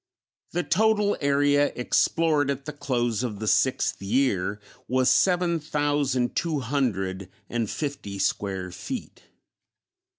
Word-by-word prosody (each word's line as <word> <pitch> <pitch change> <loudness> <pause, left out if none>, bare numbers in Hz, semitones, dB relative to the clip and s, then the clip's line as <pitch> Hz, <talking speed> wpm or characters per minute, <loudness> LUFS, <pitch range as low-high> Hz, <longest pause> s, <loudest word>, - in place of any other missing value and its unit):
The 175 +1 -1
total 210 +5 +2
area 145 0 +3
explored 150 +3 +2
at 140 0 -3
the 150 - -5
close 120 -5 -1
of 115 -5 -3
the 110 +1 -5
sixth 130 0 +2
year 105 -3 0 0.3
was 130 +1 +3
seven 175 -2 +3
thousand 145 -4 0
two 165 -4 0
hundred 100 -8 -1 0.2
and 115 -3 -1
fifty 140 -10 -4
square 95 -2 -1
feet. - - -7
135 Hz, 120 wpm, -25 LUFS, 110-150 Hz, 0.3 s, area